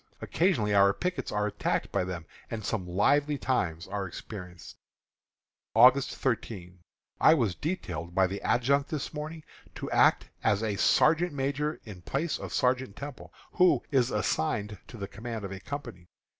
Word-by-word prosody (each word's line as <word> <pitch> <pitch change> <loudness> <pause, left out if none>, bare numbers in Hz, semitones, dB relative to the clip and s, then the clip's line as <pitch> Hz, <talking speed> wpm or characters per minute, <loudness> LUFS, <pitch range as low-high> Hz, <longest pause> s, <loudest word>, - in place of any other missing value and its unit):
Occasionally 130 - +1
our 100 0 +5
pickets 180 0 -3
are 105 0 0
attacked 105 - -1
by - - +1
them, 90 -2 -5 0.2
and 110 -3 -5
some 95 -6 -2
lively 145 +11 +2
times 90 -12 -1
are 100 -2 -3
experienced. 90 -1 -9 1.0
August 125 +4 +6
13. 95 -8 -3 0.4
I 155 - +7
was 115 - +1
detailed 90 - -4
by 95 0 +5
the 95 +2 -4
adjutant 140 +4 +2
this 155 -1 -4
morning 155 +1 -6 0.3
to - - -6
act - - +4 0.2
as 105 +1 +2 0.2
sergeant 165 +1 +4
major 145 +2 -1
in 100 -5 -10
place 145 - -2
of - - -7
Sergeant 125 -4 +1
Temple, 140 -2 -8 0.2
who 170 -8 +4
is 130 -3 +3
assigned 105 0 -1
to 120 - -10
the 100 -2 -5
command 115 -1 -6
of 95 - -6
a 95 - -6
company. 95 -9 -7
115 Hz, 155 wpm, -29 LUFS, 95-145 Hz, 1.0 s, I